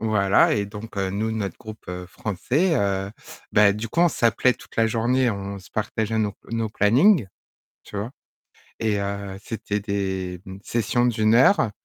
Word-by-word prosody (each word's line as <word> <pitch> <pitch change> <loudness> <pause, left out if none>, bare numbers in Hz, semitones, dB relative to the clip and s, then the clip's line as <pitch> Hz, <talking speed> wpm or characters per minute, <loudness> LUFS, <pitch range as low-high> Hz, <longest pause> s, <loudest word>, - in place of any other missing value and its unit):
Voilà 105 -3 +3
et 100 -1 -1
donc, 105 +1 -9
heu, 95 -1 -1
nous 105 +3 -1
notre 105 -5 -3
groupe, 110 0 -10
heu, 90 0 -5
français, 125 - -1
heu, 100 -3 0 0.4
bah 100 -1 +6
du 105 +3 -5
coup 165 - 0
on 175 - +6
s'appelait 120 -2 +2
toute - - -16
la 115 0 +3
journée, 120 +3 +2
on 100 -1 -5
se 90 - -17
partageait 110 +1 -2
nos 105 -2 0
p - - -24
nos 115 -1 -1
plannings, 120 - +4 0.6
tu - - -11
vois? 105 +5 -3 0.7
Et 110 -2 0
heu, 100 -1 -4
c'était 105 -2 -3
des 95 -3 -3 0.2
sessions 120 +2 0
d'1 110 -2 +3
heure 125 - +5
105 Hz, 170 wpm, -24 LUFS, 100-115 Hz, 0.7 s, bah